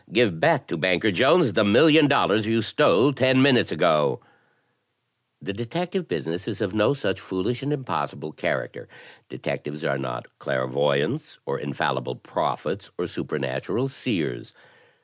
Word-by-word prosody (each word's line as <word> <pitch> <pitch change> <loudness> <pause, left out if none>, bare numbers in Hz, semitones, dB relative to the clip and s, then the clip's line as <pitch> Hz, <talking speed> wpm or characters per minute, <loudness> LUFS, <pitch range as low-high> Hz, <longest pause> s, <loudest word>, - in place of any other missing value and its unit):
give 105 -10 +2
back - - +3
to - - -5
Banker 95 +3 +2
Jones 140 - +4
the 110 - +3
$1,000,000 140 -1 +5
you 115 0 +1
stole 145 +3 +3
ten 130 0 +3
minutes 135 -4 +4
ago! 75 -1 +2 0.6
' - - -48
The 100 - -4
detect 165 - -5
ive 185 -3 -2
business 85 +4 -4
is - - -5
of 100 - -2
no 110 +6 +2
such 140 - -2
foolish 95 +6 -3
and 140 +2 -3
impossible 130 - -4
character. - - -4 0.4
Detectives 75 +2 -6
are 70 -1 -1
not 60 -3 -5
clairvoyants, 70 +2 -1
or - - -3
infallible 65 -2 -3
prophets, - - -4
or - - -2
supernatural 65 - -3
seers. 130 - -4
105 Hz, 140 wpm, -24 LUFS, -, 0.6 s, $1,000,000